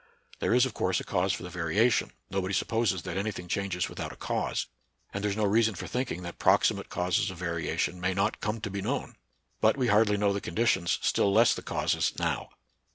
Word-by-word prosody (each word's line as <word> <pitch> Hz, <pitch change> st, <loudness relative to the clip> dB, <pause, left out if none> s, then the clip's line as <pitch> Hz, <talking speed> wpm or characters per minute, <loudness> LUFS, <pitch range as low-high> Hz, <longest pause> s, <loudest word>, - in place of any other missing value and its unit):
There -, -, +2 dB
is 125 Hz, +1 st, +5 dB
of 130 Hz, -, -4 dB
course 95 Hz, -2 st, 0 dB
a -, -, -6 dB
cause 95 Hz, 0 st, 0 dB
for 95 Hz, -, -3 dB
the 90 Hz, -, -7 dB
variation. 90 Hz, +8 st, +2 dB, 0.2 s
Nobody 95 Hz, 0 st, -1 dB
supposes 110 Hz, -6 st, 0 dB
that 90 Hz, -1 st, -4 dB
any 100 Hz, +3 st, 0 dB
thing 90 Hz, -3 st, -8 dB
changes 95 Hz, -1 st, -1 dB
without -, -, -6 dB
a -, -, -11 dB
cause; -, -, -2 dB, 0.5 s
and 100 Hz, -, -3 dB
there 105 Hz, -, +1 dB
is 100 Hz, -, -2 dB
no 110 Hz, -, +2 dB
reason 110 Hz, +1 st, +3 dB
for -, -, -6 dB
thinking 125 Hz, -8 st, -3 dB
that 85 Hz, 0 st, -8 dB
proximate -, -, +3 dB
causes 90 Hz, +1 st, 0 dB
of 95 Hz, -, -8 dB
variation 85 Hz, +1 st, -2 dB
may 90 Hz, 0 st, 0 dB
not 100 Hz, +3 st, 0 dB
come 105 Hz, +1 st, -2 dB
to 100 Hz, -, -4 dB
be 100 Hz, 0 st, -3 dB
known; -, -, -3 dB, 0.4 s
but 110 Hz, +5 st, +3 dB
we 125 Hz, -3 st, +1 dB
hardly 105 Hz, 0 st, +4 dB
know 100 Hz, 0 st, +2 dB
the 100 Hz, -, -2 dB
conditions, 95 Hz, -3 st, +1 dB
still 100 Hz, -, +2 dB
less 115 Hz, +4 st, +5 dB
the -, -, -5 dB
causes -, -, 0 dB
now. -, -, -1 dB
100 Hz, 220 wpm, -29 LUFS, 90-110 Hz, 0.5 s, is